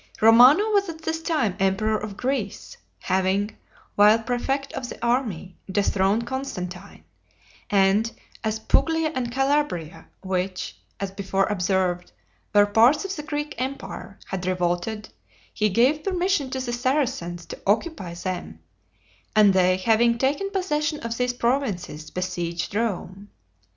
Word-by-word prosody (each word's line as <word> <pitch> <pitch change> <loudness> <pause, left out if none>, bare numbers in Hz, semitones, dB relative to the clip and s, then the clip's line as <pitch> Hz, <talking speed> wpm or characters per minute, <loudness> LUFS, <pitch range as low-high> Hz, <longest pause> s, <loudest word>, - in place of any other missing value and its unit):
Romano 245 - +7
was 400 -3 +2
at 320 -1 -8
this 320 0 -2
time 300 - 0
emperor 195 +3 +1
of 210 -1 -5
Greece, 250 -6 -3 0.3
having, 190 +3 0 0.4
while 210 +2 +6
prefect 250 +4 -2
of 245 -2 -5
the - - -8
army, 225 -8 -1
dethroned 200 +3 +1
Constantine; 200 -8 -6 0.7
and 205 +3 +3 0.3
as 220 -1 0
Puglia 320 +7 +1
and 245 -3 -2
Calabria, 270 - -1 0.2
which, 185 -1 -2 0.2
as 195 -1 -3
before 195 0 0
observed, 185 -2 0 0.4
were 205 -1 +6
parts 235 - +4
of 390 0 -3
the 300 - -5
Greek 295 0 -4
empire, 260 -5 -5
had 185 -1 -4
revolted, 185 +4 -1 0.4
he 215 0 +1
gave 255 +9 +3
permission 365 -6 0
to 260 - -3
the 250 -2 -3
Saracans 240 - -1
to - - -8
occupy 205 - 0
them; 185 +1 -5 0.8
and 210 -2 +6
they 185 0 +4
having 230 +4 +3
taken 285 +10 0
possession 305 -6 -1
of 230 0 -3
these 250 +1 0
provinces, 235 - -2
besieged 175 -1 -3
Rome. 205 -2 -3
220 Hz, 130 wpm, -24 LUFS, 190-270 Hz, 0.8 s, Romano